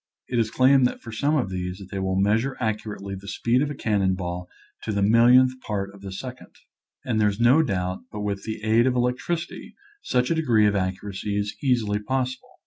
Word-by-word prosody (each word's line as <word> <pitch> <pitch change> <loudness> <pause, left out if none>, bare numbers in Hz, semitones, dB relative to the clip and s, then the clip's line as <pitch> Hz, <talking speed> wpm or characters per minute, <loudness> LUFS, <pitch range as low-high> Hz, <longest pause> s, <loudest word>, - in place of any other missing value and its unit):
It 120 - 0
is 110 -1 +1
claimed 130 +1 +4
for 110 - -10
some 145 +7 0
of 120 -9 -1
these 90 0 -4
that 95 -2 -11
they 100 - -3
will 95 0 0
meas 105 +3 +3
ure 135 +2 -4
accurately 105 -3 -3
the 95 +1 -8
speed 120 +4 +1
of 145 - 0
a 145 - -5
cannon 100 -6 +1
ball 90 -1 -5 0.3
to - - -3
the 100 -1 0
millionth 120 +4 +6
part 100 -2 -3
of 100 0 -15
a 95 - -6
second. 125 +6 -8 0.5
And 110 -3 0
there 105 - +4
is 100 +1 -5
no 125 +7 +5
doubt 95 - -2
but 105 - -5
with 100 -1 -2
the 110 -1 -5
aid 115 +3 +3
of 130 - +1
electricity 125 +8 -2 0.3
such 125 +2 0
a - - +5
degree 120 -10 +3
of 105 0 +2
accuracy 95 +1 -3
is 105 0 -2
easily 115 -6 +1
possible. 130 +2 -3
110 Hz, 215 wpm, -24 LUFS, 100-125 Hz, 0.5 s, millionth